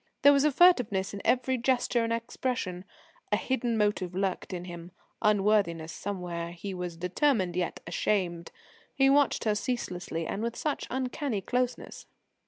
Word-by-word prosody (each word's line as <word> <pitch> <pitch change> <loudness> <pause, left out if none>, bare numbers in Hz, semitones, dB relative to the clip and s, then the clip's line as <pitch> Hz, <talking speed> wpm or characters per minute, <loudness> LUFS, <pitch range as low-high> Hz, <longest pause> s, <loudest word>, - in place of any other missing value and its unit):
There 285 - +9
was 280 +1 +4
furtiveness 250 - +4
in 200 - -5
every 255 0 +2
gesture 245 -1 +1
and 230 - -1
expression. 230 -5 -3 0.5
A 210 - +4
hidden 245 -1 -1
motive 205 -4 0
lurked 190 0 -2
in 180 -1 -5
him; 175 -1 -8 0.3
unworthiness 200 -6 +2
somewhere; 175 -4 -4
he 190 +3 -6
was 180 -2 -5
determined 185 - +1
yet 180 -1 -2
ashamed. 175 -1 -1 0.4
He 270 0 +5
watched 285 0 +3
her 215 -2 +2
ceaselessly 180 -7 -3
and 200 - -3
with 235 +1 -2
such 300 -2 -2
uncanny 255 -3 -2
closeness. 250 +4 -2
210 Hz, 145 wpm, -29 LUFS, 180-250 Hz, 0.5 s, There